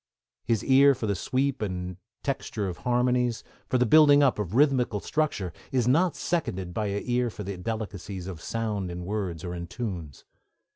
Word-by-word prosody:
His 115 -2 +1
ear 140 +1 +6
for 120 - -4
the 100 - +1
sweep 130 +7 -1
and 90 -3 -3 0.3
texture 115 -6 -2
of 90 - -5
harmonies, 125 -1 +1 0.2
for 130 - +1
the 125 - +3
building 145 +2 +7
up 130 -5 +3
of 105 0 -3
rhythmical 130 -6 +3
structure, 105 - -1 0.2
is 125 -3 +1
not 165 +7 +3
seconded 95 - -2
by 105 +3 -1
an 100 0 -2
ear 125 -1 +1
for 105 -1 -7
the 100 0 -4
delicacies 100 -2 -5
of 90 -4 -7
sound 105 -4 -2
in 90 0 -6
words 95 -5 -3
or 90 - -4
in 85 -1 -5
tunes. 90 - -6
110 Hz, 180 wpm, -27 LUFS, 95-130 Hz, 0.3 s, building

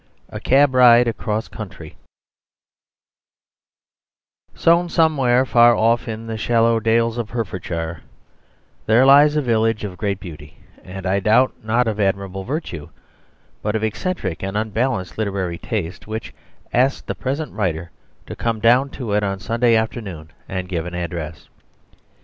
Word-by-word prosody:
A - - -7
Cab 135 +1 +3
Ride 125 -1 +6
Across 110 -1 -2
Country 90 -7 -9 2.6
Sown 170 +1 +3
somewhere 135 -7 +3
far 120 -1 +5
off 115 +3 +1
in 110 0 -5
the 110 -1 -5
shallow 115 0 +2
dales 115 +1 +1
of 115 -2 -4
Hertfordshire 85 -7 -4 0.9
there 115 +4 +5
lies 145 +2 +6
a 150 - +1
village 115 -2 +1
of 95 -3 -6
great 100 -2 -2
beauty, 80 -4 -11 0.3
and 95 +1 -8
I 95 +1 +1
doubt 115 +6 +3
not 115 +2 +1
of 110 -1 -2
admirable 95 -1 -1
virtue, 115 - -5 0.7
but 105 +1 -2
of 110 - -1
eccentric 110 - -3
and 95 +2 -3
unbalanced 110 -2 -2
literary 95 -5 -2
taste, 95 -5 -4
which 110 -2 -6 0.4
asked 130 +3 +1
the - - -3
present 140 +2 -4
writer 85 -5 -2 0.3
to - - -8
come 115 -1 -2
down 125 +5 +4
to 115 -6 -3
it 105 - +2
on 100 -1 -2
Sunday 115 +5 +2
afternoon 100 -8 -3 0.2
and 95 -1 -4
give 90 -2 -3
an 90 - -6
address. 85 -2 -5
110 Hz, 145 wpm, -20 LUFS, 95-120 Hz, 2.6 s, Ride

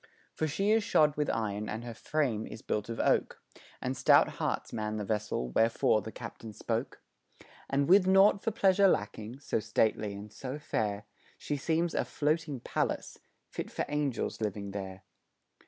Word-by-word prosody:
For 155 - -1
she 195 +8 +1
is 220 0 +4
shod 150 -8 +3
with 150 0 0
iron 105 -1 -2
and 110 +2 -4
her 120 -1 -6
frame 125 -4 -1
is 110 - -9
built 105 +1 -2
of 115 - -4
oak, - - +1 0.4
And - - -1
stout - - +5
hearts - - -2
man 110 -1 -2
the 105 - -3
vessel, 105 - -2
wherefore 110 - +3
the 110 - -7
captain 115 -2 -9
spoke; - - -3 0.7
And 140 +1 +1
with 185 +1 +6
naught 195 +1 +6
for - - +1
pleasure 200 -2 +4
lacking, 110 - -2
so 135 - -1
stately 110 -1 0
and 105 +1 -9
so 130 +2 -5
fair, 105 -8 -2 0.3
She 145 - -3
seems 165 +4 0
a - - +1
floating 150 -3 -1
palace - - -2 0.3
fit - - -6
for - - -2
angels 145 -6 -2
living 100 -1 -3
there. 95 -1 -6
115 Hz, 170 wpm, -31 LUFS, 105-155 Hz, 0.7 s, with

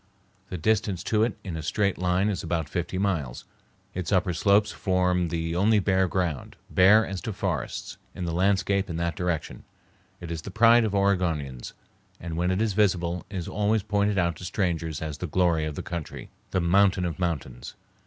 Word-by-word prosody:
The 90 - -4
distance 100 0 0
to 110 -1 +1
it 115 0 0
in 90 -5 -5
a 80 - -4
straight 100 +5 0
line 90 +2 +1
is 95 -5 -2
about 80 -2 -2
fifty 90 +2 -3
miles. 85 -10 -2 0.5
Its 90 +1 -4
upper 90 -2 +2
slopes 100 +5 +3
form 90 -2 +1
the 80 0 -2
only 105 +4 +3
bare 95 -1 +2
ground, 85 -6 -2 0.2
bare 105 +4 +6
as 95 -2 -5
to 110 - -4
forests, 90 - -4 0.2
in 90 - -4
the 85 - -2
landscape 100 +2 +1
in 85 - -4
that 85 -1 -1
direction. 90 -2 -3 0.6
It 85 -1 -7
is 80 -1 -4
the - - -8
pride 115 +3 +5
of 105 -2 -1
Oregonians, 85 -10 0 0.5
and 85 -2 -5
when 90 +2 0
it 95 +4 +1
is 110 -3 0
visible 90 -4 +1
is 95 -4 -5
always 105 0 0
pointed 105 -1 0
out 85 -3 +1
to - - -11
strangers 85 -5 -2
as 75 -2 -5
the 90 - -3
glory 85 -1 +1
of 75 -1 -4
the - - -5
country, 85 -4 -6 0.2
the 95 - 0
mountain 95 +1 +3
of 85 -2 -4
mountains. 70 -9 -4
90 Hz, 190 wpm, -26 LUFS, 85-100 Hz, 0.6 s, bare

